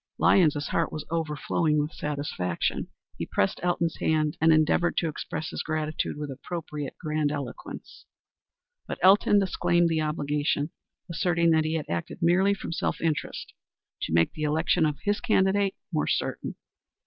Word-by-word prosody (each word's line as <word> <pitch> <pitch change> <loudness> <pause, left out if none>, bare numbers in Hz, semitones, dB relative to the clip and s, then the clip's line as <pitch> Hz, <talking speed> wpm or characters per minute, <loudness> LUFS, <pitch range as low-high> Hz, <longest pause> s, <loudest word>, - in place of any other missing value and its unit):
Lyons's 150 -6 +3
heart 165 - 0
was 155 - -5
overflowing 155 -1 0
with 150 +2 -1
satisfaction. 140 - -2 0.3
He - - -3
pressed 95 - +1
Elton's 170 -1 0
hand 155 -1 +1
and 160 0 +6
endeavored 155 +2 +3
to 170 - +2
express 155 0 -4
his - - -3
gratitude 155 -1 -2
with 150 -1 -4
appropriate 150 -1 -6
grandiloquence. 150 -5 -4 0.8
But - - -4
Elton 200 +2 +6
disclaimed 175 -3 +2
the 160 -1 +1
obligation, 150 0 -1 0.4
asserting 170 0 +2
that 160 -1 +3
he 160 +1 0
had 155 - -2
acted 85 0 -3
merely 190 +4 +4
from 195 - -6
self 165 - -1
interest 160 -2 -2 0.5
to - - -3
make 85 +1 +3
the 155 - -8
election 160 +2 +2
of 150 -1 -2
his 205 +2 +1
candidate 200 -3 +2 0.2
more 155 - +1
certain. - - -2
155 Hz, 150 wpm, -27 LUFS, 150-170 Hz, 0.8 s, and